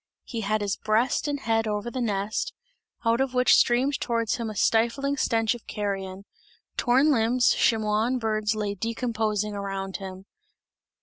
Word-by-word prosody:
He 230 -3 -5
had 215 +1 0
his 200 -1 -1
breast 225 +7 +1
and 290 -1 -2
head 225 -1 +1
over 210 +2 -2
the 255 - -3
nest, 205 -2 -1 0.5
out 230 +2 +3
of 265 -1 -1
which 250 0 +5
streamed 260 +4 +3
towards 230 -2 0
him 230 -2 -3
a 215 - -7
stifling 235 +7 +1
stench 225 -4 +1
of 240 - -11
carrion; 195 -2 -4 0.5
torn 265 +5 +3
lambs, 240 0 +3
chamois 215 -1 +2
and 255 0 0
birds 215 -1 0
lay 210 -1 -2
decomposing 220 -1 -2
around 195 -1 -4
him. 190 -1 -8
225 Hz, 160 wpm, -26 LUFS, 210-240 Hz, 0.5 s, which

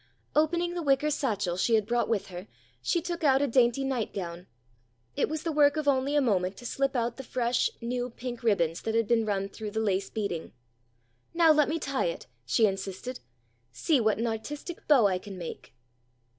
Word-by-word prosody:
Opening 340 +3 +2
the 350 - -3
wicker 290 0 +2
satchel 205 -11 -1
she 225 +4 +3
had 215 -2 +2
brought 240 +2 0
with 220 -4 -1
her 180 +2 -8 0.3
she 340 -3 0
took 345 -1 -4
out 270 -3 +5
a 285 - +2
dainty 250 0 +3
nightgown. 195 -9 -3 0.7
It - - +1
was 315 0 -3
the 330 - -1
work 290 0 +4
of 305 -2 -2
only 275 +1 +2
a 290 - +4
moment 190 -6 +1
to 245 - -11
slip 275 +3 -1
out 235 -1 -1
the 270 - -6
fresh, 245 -1 0
new 245 +1 -2
pink 240 0 -7
ribbons 170 -8 +1
that 225 - -2
had 230 -2 +2
been 225 -2 +2
run 195 -1 0
through 210 +2 -7
the 220 +2 -3
lace 195 -3 0
beading. 200 -7 -4 0.8
"Now 335 -2 +6
let 300 -2 +4
me 320 - 0
tie 275 -4 -1
it!" 170 - -3 0.2
she 130 - +4
insisted. 195 +5 -3 0.5
"See 260 - +1
what 215 -1 +2
an 230 - -1
artistic 285 +9 -5
bow 270 -7 +6
I 185 -2 +2
can 195 0 -9
make!" 170 -8 -8
235 Hz, 200 wpm, -28 LUFS, 200-285 Hz, 0.8 s, Now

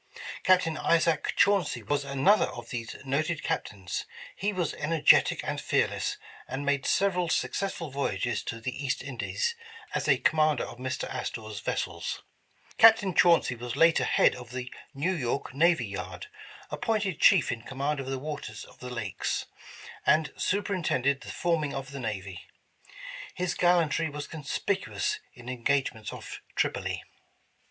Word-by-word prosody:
Captain 180 -4 +3
Isaac 165 -1 +2
Chauncy 200 -6 +3
was 145 -1 0
another 140 +9 +3
of - - -9
these 120 -2 -4
noted 155 +3 -1
Captains. 95 -3 -3 0.3
He 205 +2 -1
was 180 -5 -1
energetic 155 +1 +4
and - - -3
fearless, - - 0 0.3
and 135 +2 -4
made 140 -1 +1
several 180 -3 +2
successful 170 -2 -1
voyages 120 -4 -1
to 115 - -4
the 125 +4 -4
East 130 -2 -1
Indies 140 - -2 0.4
as - - -1
a - - +5
com 155 - +1
mander 155 -3 +3
of 120 - -8
Mr. 130 0 -3
Astor 110 -2 -4
's 105 - -5
vessels. - - -3 0.6
Captain 220 -4 +7
Chauncy 170 -6 +5
was 120 0 -5
later 165 0 +5
head - - +4
of 125 -2 -10
the 125 0 -6 0.2
New 160 +7 0
York 130 -4 -2
Navy 160 -2 +3
Yard, 100 - -6 0.5
appointed 210 -7 -1
chief 185 -9 +6
in 120 - -4
command 140 +4 -2
of 135 - -5
the 135 0 -2
waters 140 -6 -6
of - - -18
the 125 - -7
Lakes, 110 -6 -2 0.6
and 155 -1 +3
superin 200 -2 -1
tended 140 0 +1
the - - -9
forming 160 -5 0
of 135 0 -5
the 140 - -6
Navy. 100 -6 -5 0.9
His 180 -1 -1
gallantry 170 -2 +3
was 145 0 -5
conspicuous 195 - -2 0.2
in 120 -1 -13
engagements 125 -3 -1
off - - -8
Tripoli. - - -1
145 Hz, 150 wpm, -28 LUFS, 125-170 Hz, 0.9 s, Captain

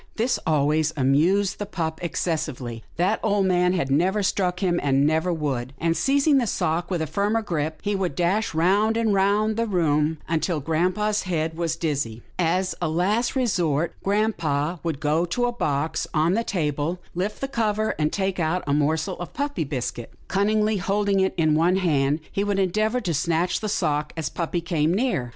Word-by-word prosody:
" - - -36
This 245 +1 +1
always 155 +1 +2
amused 165 +9 +2
the 205 - -4
pup 160 -5 -3
excessively. 145 -9 -3
That 185 +6 +1
old 205 -2 +2
man 180 -1 +3
had 170 -7 -1
never 185 +8 +2
struck 180 -2 0
him, 175 -3 +1
and 140 0 +2
never 160 +4 +1
would, 135 -6 -2
and, 165 0 +1
seizing 280 - +3
the 240 - 0
sock 170 -1 -1
with 175 -4 -1
a - - -1
firmer 205 +7 0
grip, 155 -5 -2
he 205 0 0
would 185 -7 -2
dash 180 +3 0
round 200 +7 +3
and 225 -2 +2
round 205 +3 +2
the 230 0 0
room 160 -5 +1
until 165 0 0
grampa's 180 +8 0
head 160 -2 -1
was 165 -1 -1
dizzy. 140 -9 -2 0.2
As 180 +2 +1
a 175 - 0
last 205 - +1
resort, 170 - +1
grampa 175 -6 0
would 160 -4 -3
go 150 +3 +1
to 215 +8 0
a 245 - 0
box 155 -9 -1
on 160 +3 +3
the 230 +3 +1
table, 155 -3 -1 0.2
lift 190 +4 -3
the 270 - -2
cover, 220 -4 0
and 150 0 +1
take 190 -2 -1
out 170 +2 0
a 140 - 0
morsel 160 +5 0
of 175 - -7
puppy 285 - -2
biscuit. 125 -4 -4 0.2
Cunningly 210 +2 +1
holding 200 +1 +1
it 190 0 +1
in 155 -2 +3
one 170 +4 +3
hand, 150 -5 +1
he 200 - -1
would 205 -1 0
endeavour 215 +6 +1
to 180 -6 -1
snatch 170 +3 0
the 215 - -3
sock, 150 -6 -1
as 160 - -2
puppy 170 0 -2
came 165 0 +1
near. 205 - 0
175 Hz, 185 wpm, -24 LUFS, 155-205 Hz, 0.2 s, man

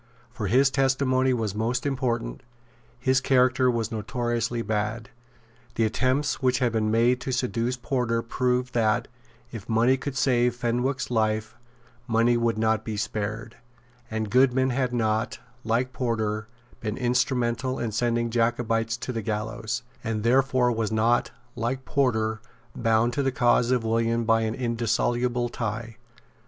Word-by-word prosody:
For 115 -4 -4
his 135 +6 +4
testimony 130 -1 +2
was 110 -5 -1
most 115 +5 -1
important; 120 - -2 0.6
his 130 +1 +2
character 130 -1 +3
was 115 -2 -1
notoriously 120 +1 -2
bad; 110 +2 -2 0.6
the 115 - +2
attempts 130 +6 0
which 130 -1 +2
had 125 -2 +1
been 110 -1 0
made 120 +3 +3
to 130 - -3
seduce 125 0 -1
Porter 120 -2 -1
proved 125 +1 -1
that, 110 -2 +1 0.4
if 115 -3 -9
money 115 +4 +3
could 135 0 -5
save 125 -2 +2
Fenwick's 125 +3 -1
life, 110 -1 0 0.5
money 115 +1 +3
would 115 -1 +1
not 110 0 +1
be 110 -2 -4
spared; 110 +2 -4 0.5
and 110 -2 -3
Goodman 130 +1 +3
had 125 0 0
not, 110 -1 0 0.3
like 120 +3 0
Porter, 110 -3 -2 0.3
been 110 -1 -4
instrumental 125 0 0
in 115 - -2
sending 120 +1 0
Jacobites 115 -1 0
to 125 - -5
the 115 - -2
gallows, 110 +2 -3 0.2
and 110 -1 -2
therefore 130 0 +3
was 110 -2 -1
not, 115 +2 +2 0.3
like 130 +3 -3
Porter, 110 -5 0 0.3
bound 115 0 +2
to 140 - 0
the 135 -1 +1
cause 120 -1 +3
of 125 -2 +2
William 115 +1 +1
by 115 0 +3
an 110 0 -1
indissoluble 120 0 0
tie. 115 0 -4
120 Hz, 145 wpm, -26 LUFS, 110-125 Hz, 0.6 s, his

